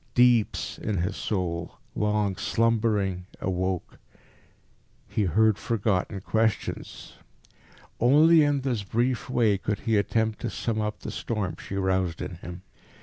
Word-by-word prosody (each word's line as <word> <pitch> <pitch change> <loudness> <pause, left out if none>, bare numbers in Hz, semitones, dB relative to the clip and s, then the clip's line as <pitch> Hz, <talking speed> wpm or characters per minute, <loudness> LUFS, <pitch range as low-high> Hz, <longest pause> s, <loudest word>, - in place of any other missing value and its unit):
Deeps 120 -3 +3
in 105 - -2
his 90 +4 -1
soul, 85 -5 -3 0.2
long 105 -2 +1
slumbering, 105 -3 0
awoke. 95 -1 -2 1.1
He 105 - 0
heard 110 +3 +3
forgotten 100 -3 -1
questions. 110 +1 -2 0.9
Only 155 +7 +6
in 145 -2 +2
this 125 -5 -1
brief 120 +6 -1
way 110 -6 +2
could 100 +1 -2
he 110 -2 +1
attempt 110 +1 0
to - - -3
sum 110 -2 -2
up 105 0 -3
the - - -5
storm 105 -6 -3
she 100 - -6
roused 95 -3 0
in - - -5
him. 90 +2 -9
105 Hz, 130 wpm, -26 LUFS, 95-115 Hz, 1.1 s, Only